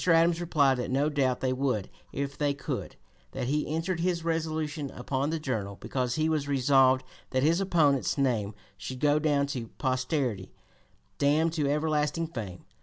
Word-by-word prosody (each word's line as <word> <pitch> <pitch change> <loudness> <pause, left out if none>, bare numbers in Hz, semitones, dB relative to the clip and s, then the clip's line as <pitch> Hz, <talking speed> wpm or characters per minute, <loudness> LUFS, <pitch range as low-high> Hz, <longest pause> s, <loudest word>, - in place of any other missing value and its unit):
Adams 165 0 +4
replied 145 -6 +3
that 125 - -3
no 140 +4 +2
doubt 135 -4 0
they 130 -1 +1
would 130 -7 -1 0.2
if 140 0 -3
they 145 -1 0
could; 140 - -5 0.4
that - - -3
he 150 +4 0
entered 165 +3 -2
his 170 -1 0
resolution 155 -3 -2
upon 135 +3 -2
the 160 0 -1
Journal 110 -9 -3
because 125 -2 -2
he 155 0 +1
was 155 -3 0
resolved 130 -1 +4 0.3
that 130 0 0
his 165 +5 +3
opponent's 155 -8 +2
"name 115 -7 0 0.2
should 130 -1 -6
go 150 +1 +3
down 145 -2 +2
to 130 -5 -4
posterity 130 - -1 0.7
damned 155 +3 +3
to 150 -4 0
everlasting 150 +1 0
fame." 110 - -7
145 Hz, 165 wpm, -28 LUFS, 130-155 Hz, 0.7 s, Adams